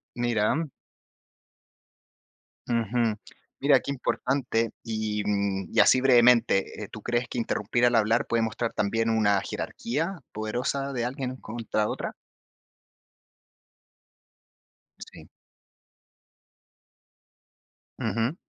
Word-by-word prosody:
mira. 120 +6 +1 2.0
Ujú. 115 -1 +1 0.4
Mira, - - +5
qué 140 - -5
importante. 125 -3 -1
Y, 110 -2 -2
mm, 100 -2 -1
y - - +2
así 130 - +6
brevemente, 120 -5 +4
eh, - - -6
¿tú 110 - -8
crees 120 +1 -1
que - - -6
interrumpir 120 +1 0
al 120 -1 +3
hablar 110 +1 +3
puede 115 -1 +1
mostrar 115 +1 -2
también 115 +2 0
una 105 -3 +3
jerarquía 165 - -3
poderosa 125 +6 -2
de 120 -1 -1
alguien 130 0 -4
contra 110 -2 -2
otra? - - -4 2.8
Sí. - - -13 2.7
Ujú. 115 - -1
115 Hz, 95 wpm, -27 LUFS, 110-125 Hz, 2.8 s, así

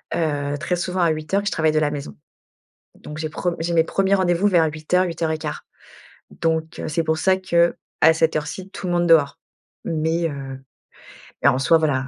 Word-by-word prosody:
heu, 145 -3 -1
très 170 +4 -1
souvent 180 +1 -2
à 170 - +4
8:00 155 +5 -1
et - - -10
je 205 - 0
travaille 160 -1 +2
de 155 - +2
la 150 -1 +1
maison. 140 - -6 0.8
Donc 150 - -9
j'ai 155 0 -3
pre 175 +3 -2
j'ai 170 +1 -2
mes 165 -1 +4
premiers 195 +4 +1
rendez-vous 185 0 +2
vers 175 -5 +4
8:00-8:15. 160 0 -1 0.8
Donc 160 -1 -1
c'est 165 +2 0
pour 160 0 0
ça 190 +3 +2
que 170 -2 +2 0.3
à 160 - +7
cette 160 0 +1
heure 150 -1 -1
ci, 190 +5 -7
tout 195 -1 -7
le 175 - -1
monde 175 0 +1
dehors. 155 -4 +4 0.5
Mais, 165 +1 0
heu, 135 -2 -7 0.8
et - - +5
en 135 -2 +4
soi, 150 +5 +4
voilà. 140 -4 0
160 Hz, 195 wpm, -22 LUFS, 155-175 Hz, 0.8 s, à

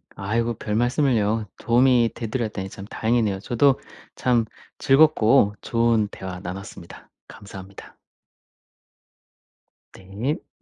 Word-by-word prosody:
아이고 115 +4 -1
별말씀을요. 115 -1 0
도움이 120 -1 +3
돼 115 - -5
드렸다니 110 -5 -3
참 95 +1 -10
다행이네요. 110 -3 0
저도 130 +6 +2 0.4
참 120 -3 +1 0.3
즐겁고 135 -6 +4
좋은 115 -2 +1
대화 95 -2 -8
나눴습니다. 90 -1 -9 0.2
감사합니다. 100 -1 -12 2.0
네. 105 +11 -5
115 Hz, 245 characters per minute, -23 LUFS, 100-120 Hz, 2.0 s, 즐겁고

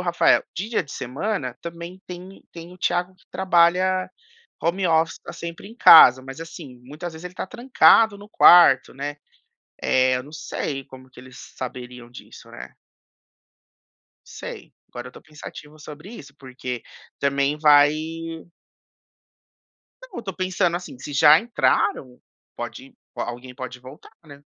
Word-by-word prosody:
Rafael. 175 -1 +3
Dia 210 +3 -2
de 140 - -12
semana, 130 - -4
também 170 +2 -9
tem 180 +2 -11
tem 170 +1 -11
o 180 - -16
Tiago 175 +1 -1
que - - -29
trabalha 185 0 +2 0.5
home 180 +3 -1
office, 160 0 +1
tá - - -10
sempre 170 +4 -8
em 225 - -14
casa, 130 - +8
mas 135 +3 -10
assim, 150 -6 -10
muitas 155 +5 -8
vezes 160 +2 -12
ele 180 0 -8
tá - - -5
trancado 225 -3 +4
no 205 +1 -13
quarto, 170 -11 +6
né. 145 +2 -6 0.7
Eh, 130 0 +2
eu 125 - -4
não 145 +3 -15
sei 135 -3 -5
como 130 0 -15
que 125 - -14
eles 130 0 -15
saberiam 125 -1 -9
disso, 120 - -14
né. 60 +1 -11 1.5
Sei, - - -10 0.2
agora 120 +1 -9
eu - - -16
tô - - -14
pensativo 155 0 -12
sobre 155 +7 -11
isso, 145 -12 -12
porque 125 -3 -7 0.4
também 140 +1 0
vai 145 -1 +6 2.1
Não, - - -10
eu - - -6
tô 190 -4 -6
pensando 185 -2 -1
assim, 175 -8 -9
se 145 +2 -8
já 150 +2 +6
entraram, 130 - -1 0.4
pode - - -9 0.2
alguém 125 +1 -6
pode 125 -1 -8
voltar, 130 +4 -14
né. 145 -2 -15
155 Hz, 145 wpm, -22 LUFS, 130-180 Hz, 2.1 s, casa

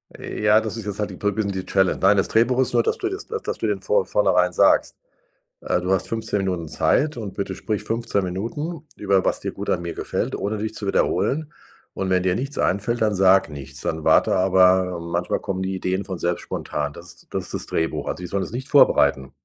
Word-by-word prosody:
Ja, 105 +1 +2
das 110 0 -4
ist 110 - -6
jetzt 105 -1 -4
halt 105 - -1
die 95 - -9
Pr 105 0 0
bisschen 105 -1 -1
die 95 -1 -4
Challenge 95 -2 +1
nein, 95 +2 +5
das 95 - +1
Drehbuch 125 +3 +3
nur, 120 - +3
dass - - 0
du 385 - -2
jetzt 385 +2 -5
dass - - -3
du - - -2
den - - -1
vor 470 +1 +1
vornherein - - +2
sagst, - - +3 0.6
äh, - - -1
du 90 +1 -2
hast 95 - +1
15 110 -2 -2
Minuten 90 -5 -2
Zeit 125 - +1
und 105 -4 -5
bitte 100 -1 -3
sprich 105 +2 -3
15 115 -4 -1 0.7
über 100 -2 +1
was - - 0
dir - - -3
gut - - -6
an - - +1
mir 85 -1 -4
gefällt, - - -3
ohne 105 +2 -2
dich 110 +1 -3
zu 105 - -5
wiederholen. 150 +9 0 0.4
Und 95 -1 -3
wenn 90 -1 +2
dir 90 -1 +1
nichts 135 +6 -4
einfällt, 110 +5 0
dann 110 -1 +2
sag 95 0 +4
nichts. 70 -2 -8
Dann 80 -1 -3
warte - - +4
aber, 95 -1 +3
manchmal 85 +1 -2
kommen 95 -1 -3
die 95 0 -2
Ideen 95 +1 -2
von 95 -2 -5
selbst 85 0 -1
spontan. 75 -1 -4
Das 85 +2 -11
das 95 -2 -3
ist - - -7
das - - -3
Drehbuch. 80 - -2
Also, - - -4
die - - -4
sollen 100 +2 -1
das - - -6
nicht 130 +3 -5
vorbereiten. 65 - +4
95 Hz, 225 wpm, -23 LUFS, 90-110 Hz, 0.7 s, nein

